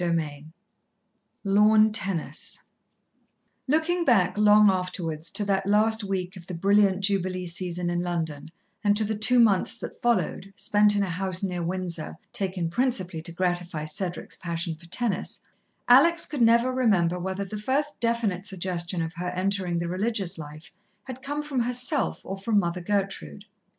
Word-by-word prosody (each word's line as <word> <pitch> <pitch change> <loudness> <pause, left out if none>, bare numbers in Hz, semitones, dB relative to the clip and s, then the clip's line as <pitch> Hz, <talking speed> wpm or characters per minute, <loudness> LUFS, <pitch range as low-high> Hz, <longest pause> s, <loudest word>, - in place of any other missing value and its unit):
XVII 155 -4 -2 1.0
Lawn 215 +2 +5
Tennis 195 -6 -2 1.0
Looking 320 +5 +1
back 195 - +3
long 210 0 +6
afterwards, 180 -4 -1
to 205 - 0
that 195 -1 0
last 215 +2 +2
week 190 -1 -3
of 175 -2 -11
the 180 - -5
brilliant 200 +1 +3
Jubilee 185 -2 0
season 175 0 -4
in 175 0 -1
London 165 -5 -3 0.4
and 205 0 +3
to 220 - +3
the 215 +1 -1
two 230 +4 +4
months 210 -5 +3
that - - -8
followed, 210 -5 0
spent 205 0 +3
in 205 - +2
a 190 - -2
house 185 +2 0
near 180 -2 -2
Windsor, 170 -2 -4 0.2
taken 185 -3 -1
principally 185 -5 -1
to 170 +1 -7
gratify 175 -3 -1
Cedric's 175 +3 -4
passion 170 0 -3
for 165 +2 -15
tennis, 210 +1 -2 0.5
Alex 335 +8 +6
could 290 -4 -4
never 235 +2 +4
remember 190 -9 +2
whether 190 +2 -3
the 210 +2 -6
first 290 +6 -1
definite 230 -6 0
suggestion 180 -2 -2
of 160 +1 -5
her 180 +1 -4
entering 185 -1 -1
the 170 0 -2
religious 190 -1 -2
life 150 +1 -10 0.3
had 260 -1 -8
come 290 +2 -3
from 285 -3 -2
herself 250 +4 0
or 195 - -4
from 210 +2 0
Mother 180 -2 0
Gertrude. 200 +1 -3
195 Hz, 155 wpm, -26 LUFS, 175-215 Hz, 1.0 s, long